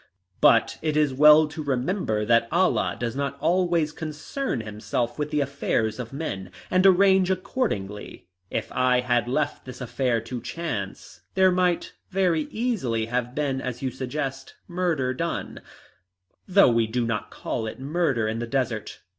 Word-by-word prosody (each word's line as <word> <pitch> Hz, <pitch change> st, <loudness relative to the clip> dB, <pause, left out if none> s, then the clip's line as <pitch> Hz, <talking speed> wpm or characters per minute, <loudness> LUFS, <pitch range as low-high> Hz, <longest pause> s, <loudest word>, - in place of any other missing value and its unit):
But -, -, +4 dB
it 155 Hz, -1 st, 0 dB
is 150 Hz, -3 st, +3 dB
well 150 Hz, +3 st, +7 dB
to 155 Hz, +1 st, -7 dB
remember 130 Hz, -, -1 dB
that 115 Hz, +1 st, +3 dB
Allah 185 Hz, +3 st, +2 dB
does 120 Hz, 0 st, -2 dB
not 140 Hz, 0 st, -2 dB
always 170 Hz, -3 st, +2 dB
concern 155 Hz, -, -4 dB
himself 110 Hz, +3 st, -3 dB
with 150 Hz, 0 st, -1 dB
the 150 Hz, -1 st, 0 dB
affairs 130 Hz, -5 st, -1 dB
of 120 Hz, -2 st, -5 dB
men, 135 Hz, -, -5 dB, 0.2 s
and 185 Hz, +1 st, +5 dB
arrange 190 Hz, 0 st, +5 dB
accordingly. 175 Hz, -, -3 dB, 0.2 s
If -, -, -3 dB
I 125 Hz, 0 st, +2 dB
had 120 Hz, -1 st, +1 dB
left 145 Hz, +3 st, -1 dB
this 125 Hz, -1 st, -9 dB
affair 125 Hz, -1 st, 0 dB
to 115 Hz, +2 st, -6 dB
chance 100 Hz, -, -5 dB
there 190 Hz, -1 st, +5 dB
might 180 Hz, -1 st, +1 dB, 0.2 s
very 180 Hz, -5 st, +1 dB
easily 185 Hz, -, -1 dB
have 125 Hz, +2 st, -2 dB
been, 140 Hz, -3 st, -1 dB
as 125 Hz, 0 st, -5 dB
you 130 Hz, -, -1 dB
suggest, 135 Hz, +1 st, -5 dB
murder 170 Hz, -8 st, 0 dB
done 170 Hz, +6 st, -4 dB, 0.9 s
though 195 Hz, -8 st, +6 dB
we 115 Hz, -1 st, +2 dB
do 120 Hz, +2 st, -1 dB
not 115 Hz, -2 st, -2 dB
call 110 Hz, -, -4 dB
it 110 Hz, -, -7 dB
murder 140 Hz, -5 st, 0 dB
in 110 Hz, +1 st, -2 dB
the 120 Hz, -, -3 dB
desert. 120 Hz, -4 st, -2 dB
135 Hz, 155 wpm, -25 LUFS, 120-170 Hz, 0.9 s, well